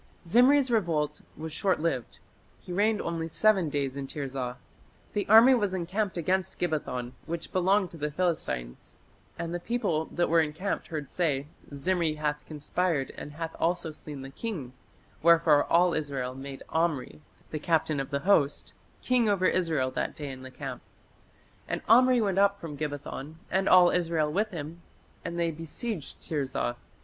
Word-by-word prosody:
Zimri's 255 Hz, +8 st, +5 dB
revolt 160 Hz, -9 st, 0 dB, 0.2 s
was 160 Hz, 0 st, -6 dB
shortlived. 165 Hz, -, -1 dB, 0.4 s
He 180 Hz, -, -8 dB
reigned 210 Hz, +3 st, +2 dB
only 165 Hz, -1 st, -2 dB
"seven 190 Hz, -1 st, +3 dB
days 140 Hz, -2 st, -2 dB
in 140 Hz, -1 st, -4 dB
Tirzah". 135 Hz, -3 st, -4 dB, 0.6 s
The 205 Hz, -, -1 dB
army 225 Hz, +5 st, +9 dB
was 205 Hz, -6 st, +1 dB
"encamped 185 Hz, +3 st, -2 dB
against 185 Hz, +2 st, 0 dB
Gibbethon, 135 Hz, -7 st, -2 dB, 0.2 s
which 170 Hz, 0 st, -5 dB
belonged 190 Hz, +1 st, +2 dB
to 170 Hz, -, -10 dB
the 150 Hz, 0 st, -2 dB
Philistines. 150 Hz, -, -3 dB, 0.4 s
And 170 Hz, 0 st, -4 dB
the 175 Hz, -, -2 dB
people 185 Hz, -7 st, -1 dB
that 175 Hz, +2 st, 0 dB
were 165 Hz, +1 st, +4 dB
encamped 160 Hz, +6 st, -2 dB
heard 150 Hz, -4 st, -5 dB
say, 145 Hz, -6 st, 0 dB, 0.3 s
Zimri 160 Hz, +2 st, 0 dB
hath 150 Hz, -1 st, -2 dB
conspired 155 Hz, -1 st, -1 dB
and 145 Hz, -, -8 dB
hath 165 Hz, +1 st, -5 dB
also 165 Hz, -1 st, 0 dB
slain 150 Hz, -2 st, -9 dB
the 135 Hz, -, -8 dB
king; 155 Hz, -, -5 dB, 0.5 s
wherefore 165 Hz, -3 st, +5 dB
all 175 Hz, +1 st, +4 dB
Israel 135 Hz, -5 st, -2 dB
made 135 Hz, +1 st, -8 dB
Omri, 160 Hz, -, -1 dB, 0.3 s
the 155 Hz, -, -3 dB
captain 155 Hz, -2 st, +1 dB
of 135 Hz, -, -3 dB
the 140 Hz, 0 st, -2 dB
host, 160 Hz, -7 st, +2 dB, 0.3 s
king 245 Hz, -3 st, +3 dB
over 195 Hz, -2 st, +2 dB
Israel 160 Hz, -9 st, +1 dB
that -, -, -2 dB
day 145 Hz, -2 st, -5 dB
in 130 Hz, -1 st, -9 dB
the 130 Hz, -, -8 dB
camp. -, -, -7 dB, 0.9 s
And -, -, -3 dB
Omri 250 Hz, +2 st, +6 dB
went 195 Hz, -3 st, +1 dB
up 200 Hz, 0 st, +3 dB
from 160 Hz, -3 st, -7 dB
Gibbethon 145 Hz, 0 st, -5 dB, 0.2 s
and 190 Hz, +1 st, +2 dB
all 180 Hz, -1 st, +7 dB
Israel 165 Hz, -3 st, +1 dB
with 210 Hz, +3 st, +1 dB
him, 165 Hz, -2 st, -7 dB, 0.4 s
and 170 Hz, 0 st, -4 dB
they 170 Hz, -1 st, +1 dB
besieged 165 Hz, +4 st, -6 dB
Tirzah. 135 Hz, -5 st, -1 dB
165 Hz, 160 wpm, -28 LUFS, 145-185 Hz, 0.9 s, army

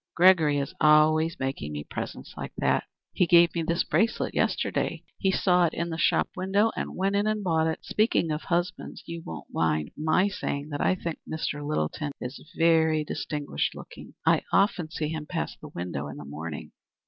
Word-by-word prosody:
"Gregory 170 Hz, -5 st, +5 dB
is 140 Hz, -1 st, -2 dB
always 155 Hz, +1 st, +5 dB
making 135 Hz, -, -3 dB
me 75 Hz, 0 st, -4 dB
presents -, -, -6 dB
like -, -, -6 dB
that. -, -, +1 dB, 0.3 s
He 180 Hz, -, +2 dB
gave 170 Hz, 0 st, +6 dB
me 170 Hz, -, -1 dB
this 170 Hz, +2 st, +1 dB
bracelet 225 Hz, 0 st, +1 dB
yesterday. -, -, 0 dB, 0.2 s
He 190 Hz, -, +2 dB
saw 180 Hz, -2 st, +3 dB
it 160 Hz, -, -5 dB
in 170 Hz, +1 st, -2 dB
the 160 Hz, -, -3 dB
shop -, -, +3 dB
window 200 Hz, +4 st, +2 dB
and -, -, -4 dB
went 195 Hz, +2 st, 0 dB
in 205 Hz, +1 st, +2 dB
and 215 Hz, -1 st, 0 dB
bought 160 Hz, -3 st, +2 dB
it. 160 Hz, -, -3 dB
Speaking 210 Hz, -6 st, +1 dB
of 150 Hz, +1 st, -2 dB
husbands, 175 Hz, 0 st, -2 dB
you 170 Hz, 0 st, -6 dB
won't 80 Hz, -, -9 dB
mind 75 Hz, -2 st, 0 dB
my 155 Hz, +5 st, +2 dB
saying 145 Hz, -6 st, -3 dB
that 145 Hz, -1 st, -3 dB
I 185 Hz, -, +3 dB
think 170 Hz, -3 st, -5 dB
Mr. 150 Hz, -2 st, -3 dB
Littleton 145 Hz, -, -2 dB
is 125 Hz, +3 st, -6 dB, 0.2 s
very 160 Hz, -2 st, +4 dB
distinguished 145 Hz, -, -3 dB
looking? -, -, -11 dB
I -, -, +4 dB
often 195 Hz, -5 st, +2 dB
see 155 Hz, -1 st, -3 dB
him 155 Hz, -1 st, -5 dB
pass 170 Hz, -1 st, -3 dB
the 155 Hz, -, -11 dB
window 85 Hz, -, -5 dB
in 70 Hz, 0 st, -8 dB
the 75 Hz, -, -8 dB
morning." 75 Hz, +2 st, -7 dB
160 Hz, 190 wpm, -27 LUFS, 145-175 Hz, 0.3 s, gave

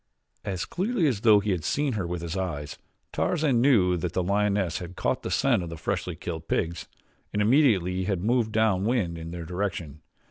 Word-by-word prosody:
As 95 Hz, -3 st, -3 dB
clearly 200 Hz, 0 st, 0 dB
as 120 Hz, -9 st, +1 dB
though 110 Hz, -3 st, +6 dB
he 105 Hz, 0 st, -1 dB
had 90 Hz, -4 st, -1 dB
seen 140 Hz, -, 0 dB
her 95 Hz, -5 st, -2 dB
with 85 Hz, -1 st, -4 dB
his 85 Hz, +1 st, -4 dB
eyes, 80 Hz, -6 st, -3 dB, 0.4 s
Tarzan 150 Hz, -8 st, +1 dB
knew 100 Hz, -10 st, +4 dB
that 85 Hz, +1 st, -3 dB
the 90 Hz, -, 0 dB
lioness 100 Hz, -2 st, +1 dB
had 90 Hz, +1 st, -8 dB
caught -, -, -1 dB
the -, -, -4 dB
scent 125 Hz, -7 st, +2 dB
of 85 Hz, -, -5 dB
the 85 Hz, -, -7 dB
freshly 90 Hz, +1 st, -3 dB
killed 80 Hz, -1 st, -6 dB
pigs 85 Hz, +1 st, -2 dB, 0.4 s
and 105 Hz, -, -2 dB
immediately 105 Hz, -, +3 dB
had 95 Hz, -2 st, -1 dB
moved 115 Hz, 0 st, +1 dB
down 110 Hz, -4 st, +2 dB
wind 105 Hz, -7 st, 0 dB
in 80 Hz, 0 st, -7 dB
their 85 Hz, -1 st, -6 dB
direction. 85 Hz, -5 st, -4 dB
95 Hz, 200 wpm, -26 LUFS, 85-110 Hz, 0.4 s, though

